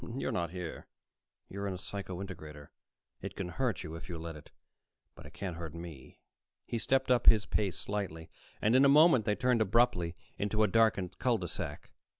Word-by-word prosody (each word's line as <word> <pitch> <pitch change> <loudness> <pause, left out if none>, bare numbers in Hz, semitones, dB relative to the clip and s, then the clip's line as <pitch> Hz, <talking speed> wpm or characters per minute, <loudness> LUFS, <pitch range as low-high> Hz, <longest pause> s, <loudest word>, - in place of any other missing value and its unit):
"You're - - -1
not 85 -2 -1
here. 90 -1 -7 0.6
You're 100 +1 -4
in 95 - -2
a - - -5
psycho 95 -1 -5
integrator. 75 -6 -9 0.5
It - - -6
can 90 - -4
hurt 120 +1 -1
you, 80 - -7
if 80 +4 -8
you 85 - -4
let 80 0 -6
it. 75 - -13 0.6
But - - -12
it - - -15
can't 95 -4 -4
hurt 85 -2 -6
me." 85 -6 -9 0.5
He 115 - -2
stepped 130 +2 +1
up 125 - +3
his 110 -1 +7
pace 100 -4 -1
slightly, 95 -6 -4 0.4
and 110 +3 +4
in 130 - +7
a 140 - +7
moment 145 -5 +6
they 105 - +2
turned 125 -1 +2
abruptly 100 -6 +2 0.2
into 105 +1 +1
a - - +4
darkened 105 -4 +2
cul 125 -2 +2
de 90 -4 -4
sac. - - -5
95 Hz, 195 wpm, -32 LUFS, 85-115 Hz, 0.6 s, his